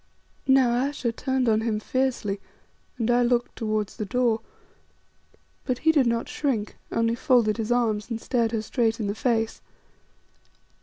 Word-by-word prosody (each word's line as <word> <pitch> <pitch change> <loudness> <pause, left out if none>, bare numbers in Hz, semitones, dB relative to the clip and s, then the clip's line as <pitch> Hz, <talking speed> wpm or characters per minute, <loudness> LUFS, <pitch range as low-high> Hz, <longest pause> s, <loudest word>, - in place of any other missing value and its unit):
Now 265 -2 +5
Ayesha 255 0 0
turned 260 +1 -1
on 220 -1 +3
him 225 -2 -1
fiercely, 240 -4 -1 0.6
and 235 0 +1
I 240 0 +4
looked 240 0 +1
towards 215 -3 -2
the 215 - -3
door. 235 0 +1 1.2
But 255 -2 -1
he 320 - +7
did 285 -6 +3
not 230 0 0
shrink, 240 -8 -2 0.2
only 230 0 +1
folded 235 -3 +2
his 225 0 -2
arms 225 -3 +1
and 230 -2 -3
stared 230 -2 0
her 225 -2 -1
straight 230 0 0
in 215 - -2
the 200 - -1
face. 225 0 -1
235 Hz, 155 wpm, -25 LUFS, 220-250 Hz, 1.2 s, he